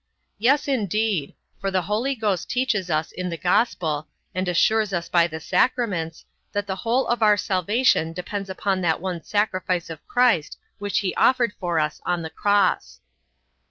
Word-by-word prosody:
Yes, 275 Hz, +7 st, +3 dB
indeed: 215 Hz, -, 0 dB, 0.2 s
for 195 Hz, -, -1 dB
the 185 Hz, -1 st, 0 dB
Holy 230 Hz, +7 st, -1 dB
Ghost 205 Hz, -7 st, -1 dB
teaches 245 Hz, -8 st, 0 dB
us 155 Hz, -1 st, 0 dB
in 180 Hz, 0 st, -4 dB
the 170 Hz, -, -4 dB
gospel, 165 Hz, -5 st, 0 dB, 0.3 s
and 185 Hz, 0 st, -2 dB
assures 210 Hz, +4 st, +2 dB
us 175 Hz, -1 st, -2 dB
by 170 Hz, -1 st, +4 dB
the 160 Hz, -1 st, -6 dB
sacraments, 180 Hz, -5 st, 0 dB, 0.3 s
that 205 Hz, 0 st, -1 dB
the 190 Hz, -1 st, -4 dB
whole 240 Hz, +5 st, +1 dB
of 240 Hz, 0 st, -1 dB
our 210 Hz, -1 st, +5 dB
salvation 200 Hz, -2 st, +1 dB
depends 190 Hz, +3 st, -5 dB
upon 190 Hz, 0 st, -1 dB
that 165 Hz, -3 st, +1 dB
one 180 Hz, -2 st, -4 dB
sacrifice 185 Hz, -5 st, -1 dB
of 155 Hz, -2 st, -9 dB
Christ 245 Hz, -11 st, +2 dB, 0.2 s
which 205 Hz, +1 st, 0 dB
he 190 Hz, -2 st, -1 dB
offered 245 Hz, -4 st, +3 dB
for 175 Hz, -3 st, 0 dB
us 150 Hz, -1 st, -2 dB
on 175 Hz, -1 st, -1 dB
the 160 Hz, -, -6 dB
cross. 205 Hz, -2 st, +1 dB
190 Hz, 165 wpm, -23 LUFS, 170-220 Hz, 0.3 s, our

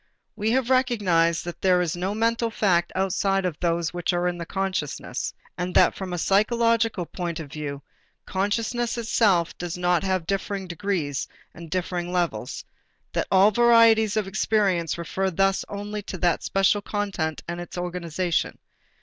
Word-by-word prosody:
We 215 Hz, 0 st, -1 dB
have 260 Hz, +1 st, +1 dB
recognized 195 Hz, -11 st, +2 dB
that 175 Hz, -, -7 dB
there 185 Hz, -1 st, +4 dB
are 180 Hz, -, +1 dB
no 185 Hz, +3 st, -2 dB
mental 230 Hz, +1 st, +1 dB
facts 180 Hz, -6 st, +1 dB
outside 195 Hz, 0 st, +1 dB
of 170 Hz, -4 st, -3 dB
those 170 Hz, -1 st, 0 dB
which 175 Hz, +1 st, -1 dB
are 175 Hz, 0 st, +1 dB
in 175 Hz, -1 st, -2 dB
consciousness 190 Hz, -5 st, -3 dB, 0.3 s
and 180 Hz, 0 st, -3 dB
that -, -, +6 dB
from 190 Hz, -2 st, -6 dB
a 175 Hz, -, -2 dB
psychological 225 Hz, +1 st, +2 dB
point 170 Hz, -1 st, -4 dB
of 150 Hz, -4 st, -8 dB
view 145 Hz, -2 st, -5 dB, 0.4 s
consciousness 225 Hz, +5 st, -1 dB
itself 205 Hz, -7 st, +2 dB
does 175 Hz, 0 st, -4 dB
not 180 Hz, -1 st, +2 dB
have 185 Hz, -3 st, -1 dB
different 195 Hz, 0 st, -3 dB
degrees 170 Hz, -6 st, -2 dB, 0.3 s
and 170 Hz, -1 st, -10 dB
different 175 Hz, 0 st, -2 dB
levels, 170 Hz, -11 st, -2 dB, 0.5 s
that -, -, -1 dB
all 195 Hz, +2 st, +6 dB
varieties 225 Hz, -2 st, +5 dB
of 210 Hz, -3 st, 0 dB
experience 195 Hz, -5 st, +1 dB
refer 190 Hz, +3 st, -1 dB
thus 195 Hz, +2 st, +1 dB
only 205 Hz, +1 st, -5 dB
to 195 Hz, -, -7 dB
the 175 Hz, -1 st, +2 dB
special 195 Hz, +1 st, +2 dB
content 195 Hz, -7 st, -3 dB
and 175 Hz, +1 st, -4 dB
its 175 Hz, -, -8 dB
organization. 175 Hz, -1 st, -2 dB
185 Hz, 155 wpm, -25 LUFS, 175-210 Hz, 0.5 s, that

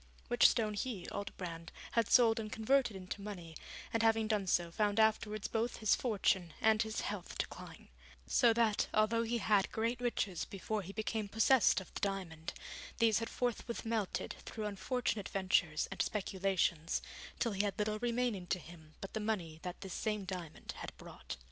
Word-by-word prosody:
Which 240 Hz, 0 st, +7 dB
stone 215 Hz, -3 st, 0 dB
he, 205 Hz, -3 st, -3 dB
Aldobrand, 170 Hz, -4 st, -5 dB, 0.2 s
had 230 Hz, -2 st, +2 dB
sold 230 Hz, -3 st, +6 dB
and 215 Hz, -1 st, -5 dB
converted 245 Hz, 0 st, +2 dB
into 190 Hz, +1 st, -6 dB
money, 180 Hz, -6 st, -7 dB, 0.4 s
and 230 Hz, -, +2 dB
having 225 Hz, -1 st, +3 dB, 0.2 s
so 175 Hz, -, +3 dB
done, 170 Hz, -, -10 dB
found 205 Hz, +3 st, +1 dB
afterwards 215 Hz, -1 st, +2 dB
both 230 Hz, +1 st, -1 dB
his 215 Hz, -2 st, +3 dB
fortune 190 Hz, -7 st, +1 dB
and 220 Hz, -1 st, +4 dB
his 220 Hz, -1 st, -1 dB
health -, -, -5 dB
decline; -, -, -6 dB, 0.4 s
so 240 Hz, -2 st, +5 dB
that, 225 Hz, -2 st, +2 dB
although 215 Hz, +2 st, +3 dB
he 230 Hz, +1 st, 0 dB
had 210 Hz, -2 st, +2 dB
great 230 Hz, +3 st, -1 dB
riches 210 Hz, -7 st, -1 dB
before 210 Hz, +2 st, -3 dB
he 190 Hz, 0 st, -8 dB
became 215 Hz, 0 st, -2 dB
possessed 225 Hz, +3 st, +5 dB
of 190 Hz, -, -12 dB
the -, -, -4 dB
diamond, 180 Hz, -5 st, -3 dB, 0.4 s
these 225 Hz, -2 st, +4 dB
had 230 Hz, -, -3 dB
forthwith 240 Hz, -1 st, -2 dB
melted 225 Hz, -4 st, -2 dB
through 215 Hz, -2 st, -5 dB
unfortunate 210 Hz, 0 st, -1 dB
ventures 185 Hz, -5 st, +2 dB
and -, -, -1 dB
speculations, 190 Hz, -5 st, 0 dB, 0.3 s
till 230 Hz, -, +1 dB
he 200 Hz, 0 st, 0 dB
had 200 Hz, -1 st, -1 dB
little 215 Hz, 0 st, 0 dB
remaining 235 Hz, -5 st, 0 dB
to 185 Hz, -, +1 dB
him 160 Hz, -2 st, -13 dB
but 195 Hz, -, -7 dB
the 220 Hz, -, -1 dB
money 185 Hz, -8 st, -2 dB
that 180 Hz, -1 st, -6 dB
this 190 Hz, -3 st, -6 dB
same 210 Hz, -2 st, -1 dB
diamond 180 Hz, -4 st, -6 dB
had -, -, -7 dB
brought. -, -, -8 dB
210 Hz, 175 wpm, -35 LUFS, 190-225 Hz, 0.4 s, Which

